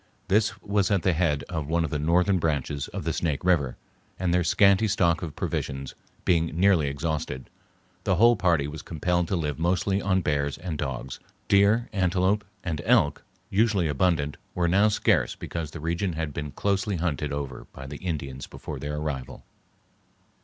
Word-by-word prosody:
This 105 +2 +2
was 100 -1 +1
at 100 -5 +1
the 95 - +3
head 80 -3 +1
of 80 -5 -3
one 85 +2 +1
of 80 - -3
the 75 - -1
northern 90 +5 +3
branches 75 -3 -1
of - - -6
the 80 +1 -1
Snake 80 -5 -1
River, 75 -9 +2 0.4
and, 90 -1 0
their 90 0 +3
scanty 100 +4 +4
stock 85 -5 +2
of 80 -4 -5
provisions 65 0 -3 0.3
being 85 -2 +3
nearly 90 -6 +4
exhausted, 70 -2 -3 0.5
the 95 - +2
whole 120 +6 +6
party 85 -8 +2
was 75 0 -7
compelled 85 +2 -1
to 95 - 0
live 75 -3 -2
mostly 90 +4 +1
on 95 -1 +2
bears 70 -3 0
and 85 -3 -5
dogs; 65 -2 -4 0.3
deer, 100 +4 +4
antelope, 95 +2 +2 0.2
and 80 -4 -2
elk, - - +3 0.3
usually 100 -4 +2
abundant, 75 -1 +1 0.2
were 85 -1 +1
now 100 +5 +4
scarce 105 - +2
because 80 -3 -5
the - - -8
region 85 +4 -1
had 80 -2 -3
been 75 +1 -4
closely 100 - 0
hunted 75 -4 -1
over 70 -3 -5
by 65 - -9
the 70 +2 -7
Indians 70 -7 -4
before 75 -3 -7
their 75 +2 -4
arrival. 75 -4 -4
85 Hz, 175 wpm, -26 LUFS, 75-95 Hz, 0.5 s, whole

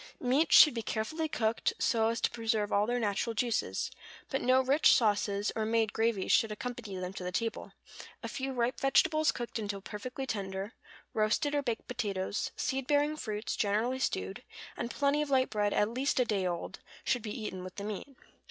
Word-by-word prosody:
Meats 270 +6 +3
should 300 - +9
be 230 - -2
carefully 225 +10 -2
cooked, 225 -4 0
so 225 -1 +2
as 230 +1 0
to - - +2
preserve 220 -3 -1
all 205 +1 +3
their 245 +1 0
natural 220 +1 -1
juices; 235 0 -1 0.4
but 270 - 0
no 255 +1 +4
rich 275 +4 +5
sauces, 205 -2 +1
or 220 - 0
made 220 -1 +1
gravies, 225 -3 +1
should 225 - +4
accompany 230 -2 -5
them 185 0 -4
to 185 - -6
the 180 - -3
table; 225 +4 -3 0.5
a - - -3
few 270 0 -3
ripe 245 -1 -1
vegetables 310 +3 +3
cooked 240 -1 -5
until 205 -2 -3
perfectly 250 +7 -6
tender, 195 -2 -4 0.4
roasted 215 +7 +1
or 290 - +2
baked 235 -5 -3
potatoes, 200 -5 -2
seed 270 -2 -2
bearing 295 +1 +2
fruits, 215 -6 -3
generally 225 +5 0
stewed, 95 - -2 0.3
and 235 - -3
plenty 285 +3 +1
of 300 - -2
light 260 -3 +2
bread 205 -1 +1
at 210 - +2
least 260 +5 0
a 250 - +4
day 195 -5 0
old, 175 -1 -4 0.2
should 245 - +1
be 215 +1 -5
eaten 190 -4 -5
with 185 0 -8
the 200 - -6
meat. 210 +2 -4
225 Hz, 190 wpm, -31 LUFS, 205-255 Hz, 0.5 s, should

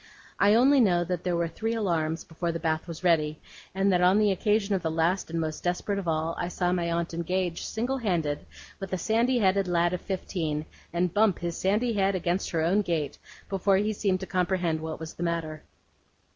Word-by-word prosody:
I 205 +1 +5
only 270 +4 +5
know 180 -7 +4
that 175 0 -3
there 180 -1 0
were 170 0 0
three 225 +8 -3
alarms 165 -6 -1
before 170 +1 -3
the 165 - -4
bath 160 0 -1
was 170 +1 -8
ready; 155 -3 +2 0.4
and 195 0 +2
that 180 - +3
on 180 +3 +5
the 210 -1 +4
occasion 210 +2 +1
of 190 - 0
the 165 - -1
last 165 +4 0
and 165 0 -2
most 155 -1 -3
desperate 180 +3 -1
of 190 - -6
all, 160 0 0
I 175 - -1
saw 180 0 -1
my 170 -2 0
aunt 170 0 -1
engage, 175 +1 -1
single 250 +4 -2
handed, 165 -10 -1 0.4
with 195 -2 -6
a - - +1
sandy 230 +7 +2
headed 195 -3 +2
lad 175 0 +2
of 180 - -3
fifteen, 160 -5 -3 0.3
and 175 0 0
bump 210 -3 +3
his 170 -1 -3
sandy 215 +5 +1
head 195 -1 +1
against 180 +1 -1
her 165 - 0
own 190 +6 +3
gate, 165 -7 -2 0.3
before 195 0 +2
he 210 +2 0
seemed 195 -2 0
to - - -3
comprehend 180 -3 0
what 160 0 -5
was 160 0 -7
the - - -10
matter. 165 -3 -2
180 Hz, 215 wpm, -27 LUFS, 165-195 Hz, 0.4 s, I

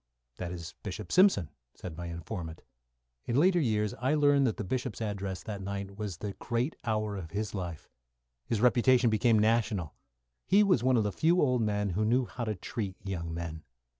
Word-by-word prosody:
"That 90 -1 -4
is 85 -1 -7
Bishop 100 -1 -6
Simpson," 185 - +4 0.2
said 85 -3 -8
my 85 +1 -6
informant. 85 0 -6 0.6
In 120 - 0
later 180 +2 +4
years, 105 -7 +1
I 130 +6 0
learned 145 -2 +4
that 110 - -1
the - - -3
Bishop's 120 +1 -3
address 100 -4 -3
that 105 -3 -5
night 100 0 -5
was 100 -4 -5
the 100 +1 -5
great 120 +5 -1
hour 110 -2 -1
of 90 -5 -6
his 105 +4 -3
life. 90 -5 -5 0.6
His 110 -3 0
reputation 125 -1 +4
became 110 +1 +3
national. 105 -6 +1 0.5
He 205 +2 +6
was 185 - +3
one 130 -1 +4
of 110 - +3
the 105 - -1
few 170 - +2
old 125 -6 +3
men 105 -2 0
who 100 +5 0
knew 120 +4 +2
how 120 0 -5
to 110 -1 -2
treat 95 +1 -4
young 85 -4 -4
men. 80 -1 -5
105 Hz, 190 wpm, -30 LUFS, 95-125 Hz, 0.6 s, He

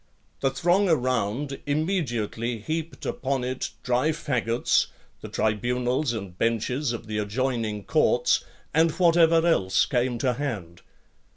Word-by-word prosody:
The 135 - +2
throng 175 +8 +2
around 130 -1 0
immediately 125 - -1
heaped 160 +8 -4
upon 135 -1 -1
it 130 +1 -3
dry 125 +4 +2
faggots, 125 -7 +1 0.3
the - - -7
tribunals 125 +5 0
and 100 -6 -6
benches 115 +6 0
of 115 -1 -5
the 105 0 -3
adjoining 110 -1 -1
courts, - - +2 0.3
and 160 +3 +4
whatever 165 -2 +4
else 95 - +3
came 125 -1 0
to 125 +1 +1
hand. 110 -11 -5
125 Hz, 120 wpm, -26 LUFS, 115-150 Hz, 0.3 s, and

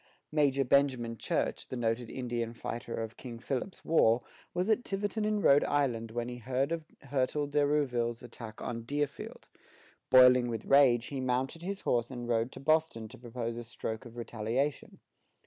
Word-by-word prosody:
Major 140 -3 +3
Benjamin 125 -3 +2
Church, - - -2
the - - -5
noted 115 0 -1
Indian 120 -2 -3
fighter 115 0 -5
of 115 0 -5
King 120 -3 -8
Philip's 135 +9 -4
War, 120 -7 +4 0.3
was 180 +2 -1
at 225 +2 +2
Tiverton 205 +2 -2
in 210 -1 +1
Rhode 140 +1 +6
Island 120 -6 0
when 120 +1 -3
he 125 0 -6
heard 130 +5 -1
of 165 -2 -2 0.2
Hertel 140 +2 0
de 145 0 +1
Rouville's 125 -6 0
attack 115 -2 -9
on 115 -1 -3
Deerfield. 145 +4 -4 0.6
Boiling 125 -1 +7
with 115 -2 -4
rage, 130 -4 +5
he 135 -2 -3
mounted 130 +5 -1
his 195 +3 -4
horse 120 -1 +1
and 120 -2 -6
rode 115 +1 +1
to - - -9
Boston 155 -7 +1
to 130 - -12
propose 120 -1 -4
a - - -6
stroke 110 -1 -5
of 120 +1 -14
retaliation. 120 +5 -2
125 Hz, 170 wpm, -31 LUFS, 115-145 Hz, 0.6 s, Boiling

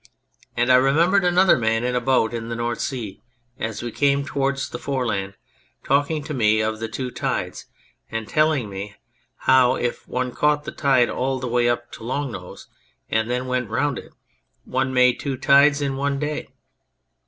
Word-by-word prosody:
And 120 +1 +3
I 125 - +8
remember 160 +9 +3
another 180 -3 +4
man 115 0 +1
in 125 0 -1
a 125 - +1
boat 120 -3 +2
in 115 -1 -5
the 115 - -3
North 120 0 -2
Sea, 115 -8 -4 0.4
as 110 +1 -4
we 120 - -4
came 140 +3 +1
towards 140 -1 -1
the - - -5
Foreland, 110 -8 -2 0.5
talking 145 +2 +1
to 155 - -5
me 110 -4 +3
of 110 0 -1
the 115 - -3
two 125 +2 -5
tides, - - -3 0.4
and 115 -1 -4
telling 155 -6 +2
me 100 +1 -7 0.5
how 130 -1 +5
if 120 - -3
one 125 0 -2
caught 150 +2 +1
the - - -6
tide 130 -4 +2
all 130 +1 -1
the 130 -1 -4
way 120 0 +2
up 120 0 -2
to - - -10
Long 130 +3 -2
Nose 90 -4 -9 0.5
and 110 +1 +1
then 125 +1 -1
went 125 -3 -2
round 130 +3 0
it, - - -13 0.5
one 130 +1 -1
made 125 -1 +4
two 135 -2 -3
tides 140 +2 +4
in 140 -1 -1
one 140 0 -1
day. 150 +1 -3
125 Hz, 185 wpm, -22 LUFS, 115-140 Hz, 0.5 s, I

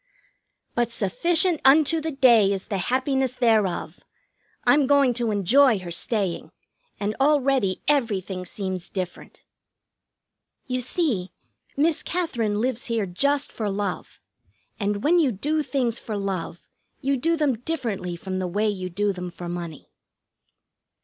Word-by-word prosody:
But 240 -1 +1
sufficient 325 - +1
unto 310 +4 +5
the 320 - -2
day 240 -8 +5
is 195 -1 -2
the 200 -3 -3
happiness 260 +4 0
thereof! 220 -8 +1 0.6
I'm 285 -2 +4
going 280 -3 +4
to 235 -1 -1
enjoy 225 +5 +4
her 180 -2 -7
staying, 190 0 -2 0.5
and 210 +1 -2
already 270 -8 +2
everything 205 -10 0
seems 185 -1 -4
different. 185 -3 -6 1.2
You 255 -1 -2
see, 250 - -1 0.4
Miss 310 +2 +2
Katherine 235 -12 -1
lives 250 -1 -1
here 230 -3 -1
just 280 +11 0
for 215 -3 -3
love, 200 -1 -4 0.6
and 205 0 -1
when 345 +4 +4
you 290 -6 +3
do 295 +10 -1
things 250 -6 -1
for 215 -2 -5
love 190 -4 -4 0.3
you 275 +1 +1
do 330 +6 +1
them 280 -7 +1
differently 230 - -3
from 185 +2 -4
the 185 - -2
way 205 +5 0
you 185 -3 -2
do 200 +3 0
them 180 -1 -5
for 175 0 -8
money. 170 -3 -7
225 Hz, 135 wpm, -24 LUFS, 190-275 Hz, 1.2 s, unto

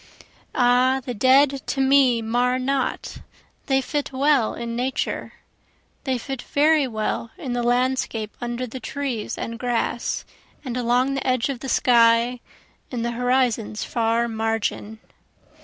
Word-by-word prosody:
Ah 250 +2 +3
the 245 - -3
dead 265 +4 +4
to 275 - -2
me 265 -3 +4
mar 245 +3 +1
not, 265 0 -2 0.5
they 270 -1 +2
fit 290 +2 -3
well 275 -3 +2
in 235 0 -5
Nature, 255 +2 -2 0.7
They 260 -2 0
fit 265 +1 -6
very 300 -1 +2
well 220 0 -3
in 255 - -4
the 245 - -1
landscape 245 -3 0
under 240 +1 -3
the 255 +2 -7
trees 255 -2 -4
and 230 0 -5
grass, 240 -1 -2 0.4
And 250 -2 -4
along 250 +2 +1
the 275 - -3
edge 255 0 +1
of 270 -3 -3
the 270 - -6
sky 235 0 +4 0.5
in 240 -3 -3
the 235 - -1
horizon's 245 -3 0
far 230 0 0
margin. 220 -1 -2
245 Hz, 140 wpm, -23 LUFS, 235-265 Hz, 0.7 s, dead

